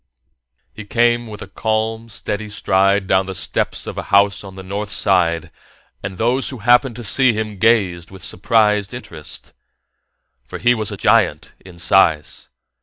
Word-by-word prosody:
He 110 - -9
came 120 +2 +1
with 105 -2 -8
a - - -11
calm, 110 +3 -2
steady 105 0 -4
stride 100 -1 +1
down 95 0 +2
the 95 - -5
steps - - -1
of - - -5
a - - -8
house 100 0 +3
on 95 -1 -11
the 95 - -9
north 100 +2 -4
side, 85 -5 +1 0.5
and 95 -1 -6
those 125 +5 +1
who 130 - -7
happened 120 +3 +3
to 120 - -7
see 130 +2 +3
him 110 -2 -4
gazed 95 -6 +2
with 95 -1 -12
surprised 105 0 +1
interest. 80 -11 -8 0.9
For - - -8
he 120 0 +3
was 110 -3 -2
a - - -6
giant - - +2
in 90 -2 -14
size. 85 -4 +2
100 Hz, 165 wpm, -19 LUFS, 95-115 Hz, 0.9 s, house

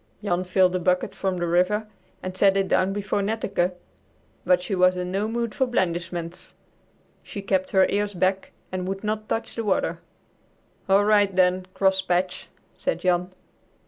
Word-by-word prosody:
Jan 180 -3 0
filled 185 0 +3
the 185 - 0
bucket 180 +2 +1
from 190 -2 -2
the 175 - -1
river 180 +5 +2 0.4
and 185 0 -5
set 195 0 +4
it 195 -1 +1
down 185 +1 +2
before 205 0 -1
Netteke, 195 -4 -1 0.7
but 180 -1 +4
she 180 +3 -5
was 185 0 +4
in 180 0 -3
no 200 +3 0
mood 235 0 -2
for 265 - +1
blandishments. 175 -5 -3 0.7
She 200 - -8
kept 190 -1 0
her 190 -1 +4
ears 205 0 -1
back 190 +2 0 0.2
and 185 0 -3
would 195 +1 -4
not 215 0 -3
touch 225 - -2
the 230 - -3
water. 205 -3 0 0.9
"All 200 +1 +5
right, 205 -2 +3
then, 185 0 +2
Crosspatch," 190 -2 +1 0.3
said - - -2
Jan. 180 0 +1
190 Hz, 165 wpm, -24 LUFS, 180-205 Hz, 0.9 s, All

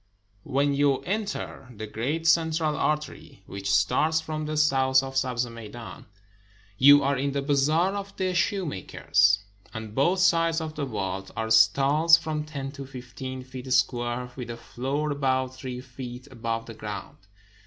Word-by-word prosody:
When 140 +1 +1
you 140 -1 +2
enter 200 -9 -4
the 110 +1 -6
great 135 +10 -3
central 160 -1 +2
artery, 150 -10 -3
which 100 0 -5
starts 130 +11 +3
from 155 -1 -4
the 155 0 -3
south 135 -3 +4
of 135 0 -6
the 135 - +3
Sabz 125 -2 -1
Meidan, 115 0 -10 0.7
you 145 +5 +7
are 140 +1 +2
in 140 +1 -1
the 140 - 0
Bazaar 155 +6 +2
of 200 0 -6
the 185 -1 0
Shoemakers. 105 - +1 0.3
On 110 -1 -6
both 155 - +2
sides 165 -2 +3
of 160 -1 -5
the 150 -2 -3
vault 95 -5 -4
are 110 0 -2
stalls, 140 +9 +6
from 155 -2 -3
ten 140 -3 -5
to 140 -2 -8
fifteen 130 0 -7
feet 130 0 -8
square, 125 -1 0
with 125 -2 -7
a 115 - -5
floor 140 +6 -3
about 130 -2 0
three 130 -1 -6
feet 125 0 -9
above 115 -2 -3
the 115 - -9
ground. 105 -2 -7
135 Hz, 160 wpm, -26 LUFS, 120-155 Hz, 0.7 s, you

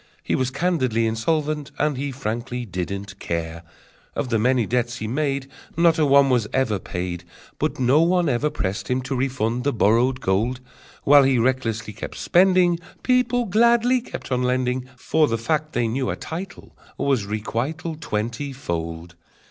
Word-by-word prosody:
He - - -2
Was 130 -1 +1
candidly 130 -6 0
insolvent, 150 +6 -1
and 150 -1 +1
he 140 +2 -3
frankly 120 0 -4
didn't 100 +1 -5
care! 85 0 -3 0.5
Of 135 - -2
the 115 -2 +1
many 125 +1 +2
debts 120 +1 -1
he 110 - -4
made 135 +2 -1 0.3
Not 170 -1 +4
a 150 - +4
one 140 0 +6
was 120 -4 +2
ever 115 -7 +1
paid, 90 -1 -4 0.4
But - - -1
no 130 +5 +4
one 175 0 +3
ever 140 +3 +1
pressed 100 -6 -3
him 125 0 0
to 130 +1 -3
refund 125 -2 -1
the 145 - +1
borrowed 120 +3 +2
gold: 115 +4 0 0.4
While 145 0 +7
he 135 -1 +3
recklessly 115 -3 0
kept 110 - -7
spending, 180 -1 +4 0.2
People 250 -1 +2
gladly 235 +4 +3
kept 230 - -8
on 125 0 +1
lending, 125 0 0
For 155 +4 +2
the 115 - 0
fact 155 +6 -1
they 120 -1 +1
knew 130 +3 -1
a - - -1
title 175 +3 -8 0.2
Was 135 -7 +1
requital 130 +10 -3
Twenty 120 -1 -3
fold! 85 -7 -5
130 Hz, 165 wpm, -23 LUFS, 115-150 Hz, 0.5 s, While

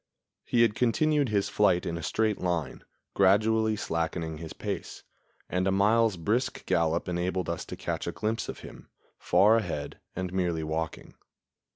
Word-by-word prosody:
He 120 -1 +3
had 115 - +3
continued 145 +4 +2
his 100 -2 +1
flight 95 -4 +2
in 85 - -2
a 85 - -5
straight 110 +1 0
line, 90 -3 -2 0.3
gradually 110 +3 +3
slackening 80 -4 -3
his 80 -1 -7
pace, - - -5 0.4
and 90 +1 0
a - - +3
mile's 105 +1 +3
brisk 110 +9 -1
gallop 85 0 +1
enabled 90 +1 -1
us 85 0 -3
to - - -7
catch - - -3
a - - -1
glimpse 110 +1 -2
of - - -7
him, - - -12 0.3
far 110 +3 +4
ahead 85 -9 -4 0.2
and 95 0 -4
merely 85 -4 0
walking. 80 +1 -4
95 Hz, 160 wpm, -28 LUFS, 85-110 Hz, 0.4 s, far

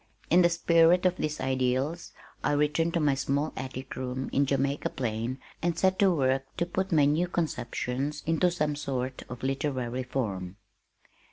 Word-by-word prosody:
In 175 +2 +7
the 175 - +5
spirit 170 +1 +4
of 185 0 +3
these 150 -2 -2
ideals 130 +5 -1 0.3
I - - +2
returned 150 +3 +1
to - - +3
my 150 -3 +3
small 140 +3 -1
attic 130 0 -6
room 130 0 -4
in 140 0 +3
Jamaica 140 +1 0
Plain 115 +1 -3 0.2
and 170 -1 0
set 190 0 +2
to 200 - +6
work 135 -5 +2
to 170 - +1
put 190 +2 -2
my 150 -4 +5
new 155 +5 +2
conceptions 140 -3 -2
into 165 +3 +3
some 150 -4 -1
sort 130 -3 -3
of 125 -1 -8
literary 130 -2 -1
form. 100 -8 -3
140 Hz, 165 wpm, -28 LUFS, 130-165 Hz, 0.3 s, In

